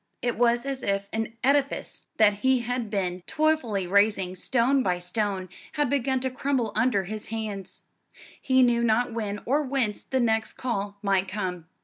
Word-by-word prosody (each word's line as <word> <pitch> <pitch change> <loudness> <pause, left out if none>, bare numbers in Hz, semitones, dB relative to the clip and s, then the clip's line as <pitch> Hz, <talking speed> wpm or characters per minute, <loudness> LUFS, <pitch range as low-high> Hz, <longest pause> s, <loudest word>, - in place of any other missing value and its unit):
It 240 -1 0
was 240 +1 +2
as 270 -1 -3
if 200 -2 -1
an 225 0 -2
edifice 275 +1 0
that 210 -2 +5
he 260 +3 +2
had 240 -2 -2
been 185 -3 -2
toilfully 305 -11 +1
raising, 195 -1 +2
stone 260 +7 +2
by 180 -6 +1
stone, 185 +1 -2 0.3
had 295 -4 0
begun 265 -1 +1
to 260 0 -1
crumble 255 -4 -1
under 225 -3 +2
his 215 +3 -6
hands. 215 -4 -6 0.6
He 260 -1 +4
knew 235 -1 +3
not 235 +1 +2
when 210 -3 -3
or 285 +5 +2
whence 260 -7 -1
the 260 - -1
next 225 -2 +1
call 205 -5 -3
might 195 -1 +2
come. 185 -4 -4
225 Hz, 165 wpm, -26 LUFS, 200-255 Hz, 0.6 s, that